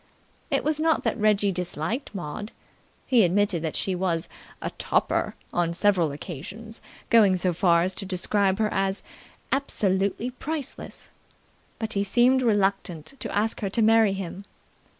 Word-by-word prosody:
It - - +1
was 305 0 0
not 320 0 +2
that - - -1
Reggie 205 -1 +3
disliked 180 - -3
Maud. 185 +4 -5 0.5
He 245 -4 +4
admitted 185 -1 +2
that 160 -2 -3
she 190 - 0
was 175 -3 0 0.3
a - - -4
"topper", - - 0 0.2
on 170 -1 +1
several 180 -4 +2
occasions 185 +10 -7 0.3
going 205 -5 +6
so 180 0 0
far 170 -1 +3
as 185 +1 +1
to 195 - -5
describe 195 +1 +1
her 215 -1 0
as 195 0 -1 0.5
"absolutely 210 -4 0
priceless". 290 +2 -5 0.7
But 220 -1 -3
he 200 - +1
seemed 245 +5 +4
reluctant 195 - 0
to - - -3
ask 220 +2 +1
her 200 - -1
to 225 +3 +1
marry 220 -2 +5
him. 195 0 -6
200 Hz, 150 wpm, -25 LUFS, 180-225 Hz, 0.7 s, going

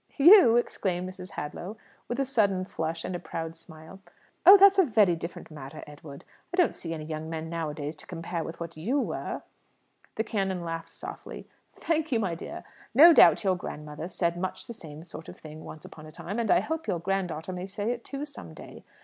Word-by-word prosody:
"You?" 310 - +8
exclaimed 185 -6 -1
Mrs. 185 0 -9
Hadlow, 180 +8 -6 0.3
with 245 - -3
a 275 - +2
sudden 200 -8 +1
flush 165 -2 -4
and 185 - -3
a - - -3
proud 165 -1 -5
smile. 160 +2 -13 0.5
"Oh, 390 +2 +12
that's 395 0 +7
a - - +8
very 215 - +4
different 165 0 -8
matter, 145 0 -9
Edward. 145 -1 -12 0.3
I 360 - -4
don't 355 - +4
see 165 - -7
any 155 -1 -7
young 155 0 -5
men 160 0 -5
nowadays 155 -2 -4
to - - -12
compare 170 -1 -4
with 165 +2 -8
what 170 -1 -6
you 225 - 0
were." - - -3 0.7
The 220 - 0
canon 195 -5 -2
laughed 165 0 -5
softly. - - -9 0.3
"Thank 320 -2 -1
you, 235 - +2
my 190 -6 -1
dear. 165 - -7 0.3
No 330 +6 +10
doubt - - +7
your 190 -2 +2
grandmother 150 -1 -7
said 170 -1 -1
much 185 +1 -4
the 235 - -7
same 155 -7 -11
sort 165 -1 -10
of - - -11
thing 155 0 -11
once 155 - -10
upon 155 -1 -11
a - - -11
time; 195 +7 -5
and 230 - -1
I 350 - +5
hope 320 -3 -4
your 190 -4 0
grand 195 +2 -1
daughter 160 +3 -5
may 180 +1 -5
say 205 +3 -2
it 240 -1 -5
too, 280 +1 -5
some 290 - -11
day. - - -12
180 Hz, 210 wpm, -28 LUFS, 160-230 Hz, 0.7 s, Oh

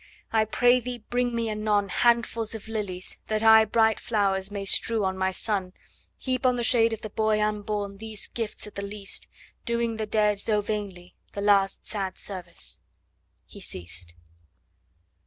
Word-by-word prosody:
I 220 -1 +4
pray 245 +3 +4
thee 250 0 -5
bring 245 -1 +1
me 230 -1 0
anon 210 -2 0
Handfuls 230 0 +1
of 220 0 -9
lilies, 200 -5 -4
that 215 0 0
I 220 0 +8
bright 220 0 +3
flowers 195 -3 0
may 200 -1 -5
strew 220 +2 +3
on 190 0 0
my 190 0 +1
son, 190 -1 -2 0.4
Heap 255 -1 -2
on 255 -1 +4
the 240 - -1
shade 230 -1 +5
of 225 - -4
the 215 - -5
boy 215 0 +1
unborn 210 -1 -2
these 220 -2 -6
gifts 225 -3 -5
at 210 - -10
the 200 - -5
least, 200 0 -4 0.4
Doing 235 -1 -1
the 215 -1 -3
dead, 210 -1 +2
though 210 -2 +2
vainly, 200 -4 -5 0.2
the 200 - -4
last 200 -1 +3
sad 195 -3 -3
service.' 180 -4 -6 0.7
He - - -13
ceased. 85 0 -5
210 Hz, 165 wpm, -26 LUFS, 200-225 Hz, 0.7 s, I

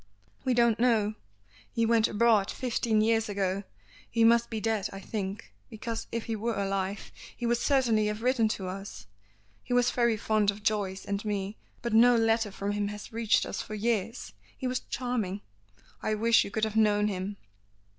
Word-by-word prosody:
"We 255 -2 +1
don't 235 -2 +3
know. 225 -3 +3 0.6
He 230 - +1
went 230 -1 +4
abroad 215 -2 +3
fifteen 230 -3 0
years 225 0 +2
ago. 195 -1 -1 0.5
He 230 0 +2
must 235 +1 +5
be 225 - -3
dead 220 -2 -1
I 195 - -7
think, 195 - -5 0.2
because 225 +1 -5
if 230 -1 -3
he 225 - -2
were 225 +2 -2
alive 195 0 -2 0.3
he 240 - -4
would 235 0 +2
certainly 240 -6 +2
have 210 +1 -3
written 250 -3 +3
to 200 -3 -3
us. 185 - -7 0.6
He 245 - -3
was 245 0 +3
very 235 -2 +2
fond 215 -1 +1
of 205 +1 -3
Joyce 200 -3 -1
and 200 0 -2
me; 205 -1 -3 0.3
but 235 -2 -2
no 240 +2 +7
letter 225 -1 +2
from 200 +1 -3
him 205 0 -1
has 210 +2 -8
reached 225 -1 +2
us - - -4
for 215 - -6
years. 225 +1 -2 0.2
He 260 - -6
was 250 0 0
charming. 230 -6 -3 0.6
I 215 - 0
wish 230 +2 +4
you - - -6
could 215 +2 -3
have 220 -1 0
known 210 -1 +3
him." 200 0 -4
220 Hz, 185 wpm, -29 LUFS, 205-230 Hz, 0.6 s, no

